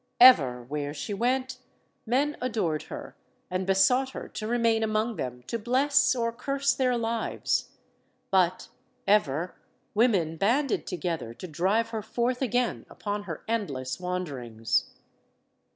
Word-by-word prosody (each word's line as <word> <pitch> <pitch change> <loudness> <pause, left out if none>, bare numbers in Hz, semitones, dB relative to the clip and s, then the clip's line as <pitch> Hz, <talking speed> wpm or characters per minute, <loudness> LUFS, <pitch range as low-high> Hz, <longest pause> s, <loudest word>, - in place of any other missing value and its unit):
Ever, 135 - +7
where 145 +3 -4
she 205 - -4
went, 255 +5 0 0.5
men 285 +5 +1
adored 210 -11 0
her - - -7 0.4
and 185 +1 -1
besought 250 +8 +4
her - - -6
to 215 - -5
remain 230 -1 +2
among 220 +1 0
them 125 -1 -5
to 230 - -3
bless 260 +3 +3
or 230 -1 0
curse 275 +2 0
their 255 -2 +1
lives. 230 -1 -1 0.6
But, 185 -2 +2 0.4
ever, 180 -4 +2 0.4
women 195 -8 +2
banded 245 - +1
together 165 -9 -3
to 185 - -8
drive 195 +8 +1
her 225 -1 -3
forth 240 +4 -1
again 245 -2 0
upon 205 0 -4
her 165 - -5
endless 145 - -2
wanderings. 135 - -1
215 Hz, 130 wpm, -28 LUFS, 170-245 Hz, 0.6 s, Ever